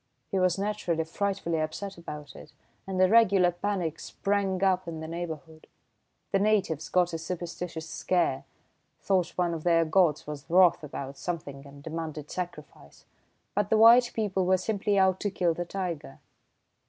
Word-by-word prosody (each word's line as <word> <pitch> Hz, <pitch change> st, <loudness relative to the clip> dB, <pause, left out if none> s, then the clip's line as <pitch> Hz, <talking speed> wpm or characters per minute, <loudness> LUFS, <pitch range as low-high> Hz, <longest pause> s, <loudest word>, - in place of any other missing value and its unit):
He 195 Hz, -, +1 dB
was 185 Hz, -1 st, +2 dB
naturally 195 Hz, -5 st, -1 dB
frightfully 170 Hz, -1 st, -2 dB
upset 175 Hz, +6 st, -4 dB
about 150 Hz, -4 st, -9 dB
it, 150 Hz, -, -13 dB, 0.3 s
and 190 Hz, -1 st, -3 dB
a 185 Hz, -, +6 dB
regular 195 Hz, -4 st, +5 dB
panic 175 Hz, -3 st, -2 dB
sprang 195 Hz, -2 st, -1 dB
up 185 Hz, -2 st, +2 dB
in 165 Hz, -1 st, -5 dB
the 160 Hz, -, -6 dB
neighbourhood. 160 Hz, -1 st, -7 dB, 0.6 s
The 195 Hz, -, +3 dB
natives 195 Hz, -7 st, +1 dB
got 180 Hz, -1 st, +2 dB
a 165 Hz, -, -2 dB
superstitious 170 Hz, -1 st, -5 dB
scare 170 Hz, -7 st, 0 dB, 0.5 s
thought 185 Hz, -4 st, 0 dB
one 175 Hz, -2 st, +1 dB
of 160 Hz, -2 st, -5 dB
their 165 Hz, -1 st, +3 dB
gods 160 Hz, -2 st, +2 dB
was 145 Hz, -1 st, -8 dB
wroth 175 Hz, -1 st, +5 dB
about 140 Hz, -1 st, -7 dB
something 145 Hz, -5 st, -5 dB
and 140 Hz, 0 st, -14 dB
demanded 155 Hz, -2 st, -6 dB
sacrifice; 150 Hz, -, -8 dB, 0.5 s
but 205 Hz, -1 st, 0 dB
the 220 Hz, -, +4 dB
white 235 Hz, +2 st, +7 dB
people 200 Hz, -4 st, 0 dB
were 185 Hz, 0 st, +4 dB
simply 200 Hz, +1 st, -1 dB
out 190 Hz, -1 st, +3 dB
to 205 Hz, -, -1 dB
kill 175 Hz, -3 st, +1 dB
the 175 Hz, +2 st, -4 dB
tiger." 175 Hz, -7 st, -5 dB
175 Hz, 160 wpm, -28 LUFS, 160-195 Hz, 0.6 s, white